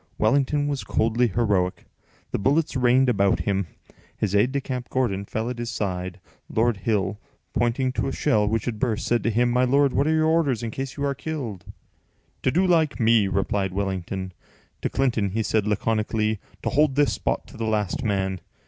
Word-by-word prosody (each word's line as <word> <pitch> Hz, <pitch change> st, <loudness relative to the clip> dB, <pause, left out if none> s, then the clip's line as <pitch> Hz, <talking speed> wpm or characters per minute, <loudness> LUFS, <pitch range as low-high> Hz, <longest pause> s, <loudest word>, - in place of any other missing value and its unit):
Wellington 140 Hz, +6 st, +2 dB
was 140 Hz, -2 st, -2 dB
coldly 115 Hz, +2 st, +1 dB
heroic. 100 Hz, -5 st, 0 dB, 0.5 s
The -, -, -1 dB
bullets 145 Hz, +8 st, +1 dB
rained 130 Hz, +1 st, +4 dB
about 100 Hz, -5 st, +2 dB
him. 100 Hz, -2 st, -1 dB, 0.5 s
His 100 Hz, -2 st, -1 dB
aide 105 Hz, +5 st, +3 dB
de 140 Hz, -, 0 dB
camp, 125 Hz, -2 st, -5 dB
Gordon, 100 Hz, -7 st, 0 dB
fell 110 Hz, +3 st, -3 dB
at 125 Hz, -1 st, -4 dB
his 120 Hz, -1 st, -3 dB
side. 95 Hz, -4 st, -3 dB, 0.3 s
Lord 115 Hz, -1 st, +1 dB
Hill, 100 Hz, 0 st, -1 dB, 0.3 s
pointing 125 Hz, +2 st, +1 dB
to 130 Hz, -, -2 dB
a -, -, -1 dB
shell 110 Hz, -8 st, +1 dB
which 110 Hz, 0 st, 0 dB
had 115 Hz, -3 st, -3 dB
burst, 110 Hz, -2 st, -1 dB
said 120 Hz, 0 st, +2 dB
to -, -, 0 dB
him: 120 Hz, +2 st, +2 dB
"My 125 Hz, +1 st, +3 dB
lord, 140 Hz, +2 st, +3 dB
what 140 Hz, -, +2 dB
are 160 Hz, -, +3 dB
your 155 Hz, 0 st, +3 dB
orders 155 Hz, -8 st, +2 dB
in 115 Hz, -, -3 dB
case 135 Hz, +4 st, -5 dB
you 140 Hz, -, -1 dB
are 140 Hz, -, +1 dB
killed?" 130 Hz, -, -5 dB, 0.8 s
"To -, -, +2 dB
do 180 Hz, +8 st, +2 dB
like 160 Hz, -5 st, +2 dB
me," 115 Hz, -3 st, +4 dB
replied 95 Hz, 0 st, -1 dB
Wellington. 95 Hz, -1 st, -3 dB, 0.5 s
To -, -, -1 dB
Clinton 120 Hz, -7 st, +1 dB
he 110 Hz, +1 st, 0 dB
said 105 Hz, 0 st, 0 dB
laconically, 110 Hz, 0 st, 0 dB, 0.2 s
"To -, -, 0 dB
hold 145 Hz, -1 st, +2 dB
this 145 Hz, 0 st, +3 dB
spot -, -, -2 dB
to 135 Hz, -, -13 dB
the 115 Hz, -, -2 dB
last 105 Hz, +2 st, -1 dB
man." 95 Hz, -4 st, -1 dB
115 Hz, 195 wpm, -24 LUFS, 100-135 Hz, 0.8 s, rained